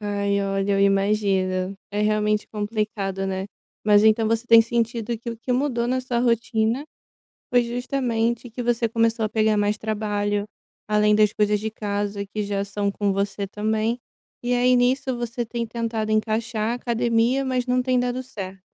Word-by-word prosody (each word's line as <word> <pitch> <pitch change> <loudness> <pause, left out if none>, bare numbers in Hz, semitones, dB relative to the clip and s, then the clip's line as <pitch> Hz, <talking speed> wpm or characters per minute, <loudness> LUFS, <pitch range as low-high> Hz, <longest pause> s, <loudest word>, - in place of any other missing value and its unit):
Ai, 200 -1 0
olha, 195 0 0
eu 195 - +2
imagino. 195 -2 +1
É 205 - -2
realmente 210 0 +1
complicado, 210 -2 -2
né. 190 0 -3 0.4
Mas 210 0 +5
então 220 +1 +4
você 230 +2 0
tem 230 -1 +8
sentido 230 0 -1
que 235 0 -6
o 230 - -6
que 250 +2 -3
mudou 245 -3 0
na 255 +1 0
sua 250 -2 -2
rotina 230 +2 +1 0.7
foi 245 0 +4
justamente 240 -1 -1
que 245 +2 -5
você 235 -1 +1
começou 230 0 +1
a - - 0
pegar 215 -1 +2
mais 205 0 +1
trabalho, 205 -1 -1 0.4
além 210 0 +3
das 210 0 +4
coisas 210 0 +2
de 220 +1 -3
casa 205 -1 -3
que 210 +2 -4
já 200 -1 -1
são 200 0 -2
com 200 0 0
você 200 0 -2
também, 220 +3 -1 0.4
e 245 0 0
aí 250 +1 +4
nisso 255 +1 +1
você 240 +1 -3
tem 235 0 -3
tentado 225 -1 -3
encaixar 215 +1 0
a - - -1
academia, 240 +2 +1
mas 255 -1 -1
não 250 0 +2
tem 255 0 +1
dado 245 +1 -1
certo? 195 -7 -8
220 Hz, 175 wpm, -23 LUFS, 205-240 Hz, 0.7 s, tem